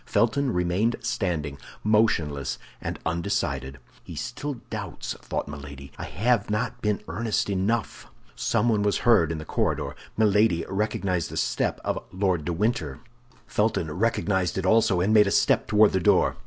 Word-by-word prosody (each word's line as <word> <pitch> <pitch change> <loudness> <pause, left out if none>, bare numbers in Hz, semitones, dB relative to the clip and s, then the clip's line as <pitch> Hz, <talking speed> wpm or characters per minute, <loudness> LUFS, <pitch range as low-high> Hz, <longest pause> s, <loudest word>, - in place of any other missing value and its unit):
Felton 130 +3 +1
remained 90 +5 +1
standing, 75 -7 -2 0.2
motionless 80 - +1 0.2
and - - -4
undecided. 75 -6 -2 0.3
"He 85 - -9
still 130 - -4 0.2
doubts," - - -4
thought - - -3
Milady; 70 -1 -9
"I - - -6
have 110 +2 +1
not 105 +1 -2
been 105 -1 0
earnest 110 -3 -1
enough." 100 +3 -1 0.3
Someone 115 -3 +1
was 105 0 +1
heard 110 -10 +5
in 80 - -3
the 75 - -7
corridor; - - -1 0.2
Milady 105 -5 +3
recognized 95 -4 -1
the - - -6
step - - 0
of - - -2
Lord 95 -5 0
de 85 - -1
Winter. 80 - -1 0.5
Felton 105 -7 0
recognized 95 -1 0
it 95 - -1
also, 100 -3 +4
and 100 +4 +2
made 105 -2 +6
a - - 0
step - - +3
toward 105 0 +5
the 95 - +1
door. 85 - +3
100 Hz, 155 wpm, -26 LUFS, 80-110 Hz, 0.5 s, made